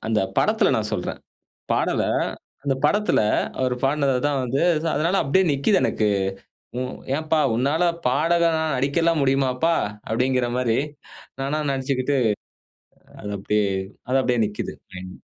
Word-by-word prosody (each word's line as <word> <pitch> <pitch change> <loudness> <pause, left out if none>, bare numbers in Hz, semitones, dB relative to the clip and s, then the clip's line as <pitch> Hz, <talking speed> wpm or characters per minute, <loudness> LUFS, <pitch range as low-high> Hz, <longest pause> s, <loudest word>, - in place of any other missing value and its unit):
அந்த 110 -1 +1 0.2
படத்துல - - +3
நான் - - -1
சொல்றேன். - - -3 0.5
பாடல, - - +1 0.6
அந்த 140 -2 +1
படத்துல 210 0 +3 0.4
அவர் 130 -1 +1
பாடுனதுதான் 140 0 +1
வந்து 125 +3 -1 0.3
அதனால 170 +6 +1
அப்படியே 190 +8 +3
நிக்குது 140 +9 +2
எனக்கு. 105 - +1 0.7
உ - - -2 0.3
ஏன்பா 155 +1 0 0.2
உன்னால 140 +8 +1 0.2
பாடகணா 165 +5 +2
நடிக்கலாம் 155 +5 +1
முடியுமாப்பா? 135 +4 +2 0.3
அப்படிங்கிற 125 +2 +1
மாரி 120 -2 +1 0.6
நானா 140 +3 -1
நடிச்சுக்கிட்டு 135 +1 -1 1.0
அது 105 - -6
அப்படியே 105 +1 +1 0.4
அது 130 - +2
அப்படியே 125 -2 +1
நிக்குது 105 0 -5 0.2
மைண்ட்ல. 95 0 -9
135 Hz, 115 wpm, -23 LUFS, 125-155 Hz, 1.0 s, படத்துல